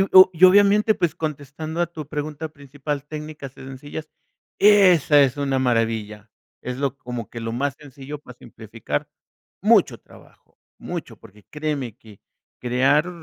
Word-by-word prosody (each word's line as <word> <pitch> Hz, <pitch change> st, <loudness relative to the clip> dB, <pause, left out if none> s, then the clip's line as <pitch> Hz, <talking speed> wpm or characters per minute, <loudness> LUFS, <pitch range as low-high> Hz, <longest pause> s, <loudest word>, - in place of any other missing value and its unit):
y 195 Hz, -, +2 dB
o 185 Hz, 0 st, +10 dB
y 170 Hz, +1 st, +4 dB
obviamente, 205 Hz, +3 st, +6 dB
pues, 175 Hz, -5 st, -1 dB
contestando 155 Hz, +1 st, -5 dB
a 175 Hz, -, +2 dB
tu 155 Hz, -4 st, -9 dB
pregunta 155 Hz, +1 st, -5 dB
principal, 145 Hz, 0 st, -6 dB
técnicas 150 Hz, -2 st, -8 dB
sencillas 135 Hz, +4 st, -9 dB, 0.5 s
esa 185 Hz, -8 st, +6 dB
es 135 Hz, -1 st, +1 dB
una 135 Hz, -2 st, 0 dB
maravilla. 110 Hz, -3 st, -1 dB, 0.3 s
Es 125 Hz, 0 st, -5 dB
lo 140 Hz, -1 st, -2 dB
como 120 Hz, -3 st, -6 dB
que 115 Hz, -, -7 dB
lo 115 Hz, 0 st, -4 dB
más 135 Hz, +3 st, -1 dB
sencillo 145 Hz, 0 st, -9 dB
para 125 Hz, -4 st, -14 dB
simplificar 110 Hz, -9 st, -6 dB, 0.5 s
mucho -, -, +4 dB
trabajo, -, -, -21 dB, 0.2 s
mucho, -, -, -7 dB
porque 105 Hz, 0 st, -18 dB
créeme 150 Hz, -6 st, -4 dB
que 110 Hz, -6 st, -17 dB, 0.4 s
crear 135 Hz, +6 st, +2 dB
145 Hz, 145 wpm, -22 LUFS, 125-155 Hz, 0.5 s, o